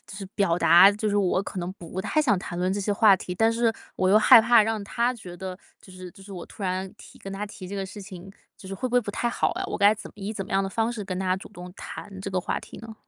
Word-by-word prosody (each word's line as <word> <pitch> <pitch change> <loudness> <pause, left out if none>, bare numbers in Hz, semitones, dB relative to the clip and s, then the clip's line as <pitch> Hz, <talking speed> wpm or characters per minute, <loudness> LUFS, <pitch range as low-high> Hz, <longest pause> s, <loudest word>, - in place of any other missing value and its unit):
就 - - -11
是 195 - -7
表 175 -4 +1
达， 175 +3 +7
就 210 +1 -2
是 205 - 0
我 190 -1 +1
可 195 - -7
能 175 +1 -4
不 175 +1 -9
太 310 - +1
想 225 -10 +2
谈 175 -1 -6
论 180 +1 0
这 200 - -2
些 205 +1 0
话 200 -1 +5
题。 180 - -6
但 225 +4 +3
是 230 0 +1 0.2
我 185 0 +2
又 210 - +7
害 220 - +8
怕 230 0 +5
让 220 -1 -2
他 235 +5 0
觉 185 -7 -10
得， 185 +1 -7 0.2
就 - - -16
是 185 -1 -10
就 195 0 -16
是 200 - -13
我 180 -3 -7
突 205 - -12
然 185 +1 -2
提 - - -15
跟 195 - -8
他 200 +2 -4
提 190 -2 -10
这 200 - -7
个 195 -1 -3
事 205 +1 -10
情， 190 -1 -10 0.3
就 190 - -11
是 195 - -5
会 255 - -3
不 245 - -6
会 245 - +4
不 210 -3 -5
太 240 +3 -2
好 - - 0
啊。 375 +2 -4
我 - - -4
该 205 +1 +5
怎 215 - -10
么 - - -26
以 200 +1 -5
怎 200 -3 -5
么 - - -9
样 195 0 +2
的 195 - -2
方 225 +4 -1
式 220 - -5
跟 185 -2 -5
他 185 -1 0
主 - - -11
动 180 -3 -11
谈 195 -1 -9
这 195 +1 -5
个 185 - 0
话 180 - -2
题 - - -12
呢？ 225 -1 -9
195 Hz, 335 characters per minute, -25 LUFS, 185-215 Hz, 0.3 s, 害